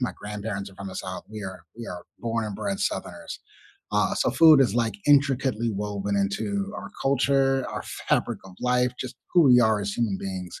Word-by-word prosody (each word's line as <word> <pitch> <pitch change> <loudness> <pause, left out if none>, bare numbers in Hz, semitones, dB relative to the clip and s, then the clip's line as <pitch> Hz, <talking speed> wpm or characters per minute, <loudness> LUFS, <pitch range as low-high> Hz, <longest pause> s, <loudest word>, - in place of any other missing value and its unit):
my 125 - -1
grandparents 105 -1 -5
are - - -17
from 100 0 -7
the 95 - -8
South; 95 -1 -5
we 110 -1 -7
are 95 -3 -7
we 115 0 -7
are 90 - -7 0.2
born 115 -1 -1
and 100 -2 -5
bred 200 0 -3
Southerners, 200 - -3 0.5
uh, - - +2
so - - +1
food 160 -3 +7
is, 115 -6 0
like, 115 -3 +1
intricately 135 -5 +3
woven 100 -1 -2
into 195 - -1
our - - -6
culture, 135 0 +2
our - - -5 0.3
fabric - - +1
of 95 - -12
life, 125 0 +2
just 130 - -6 0.2
who 175 - +6
we 125 -3 +7
are 110 -2 +3
as 100 0 -2
human 110 -4 0
beings, 95 -2 -6
115 Hz, 200 wpm, -26 LUFS, 100-135 Hz, 0.5 s, food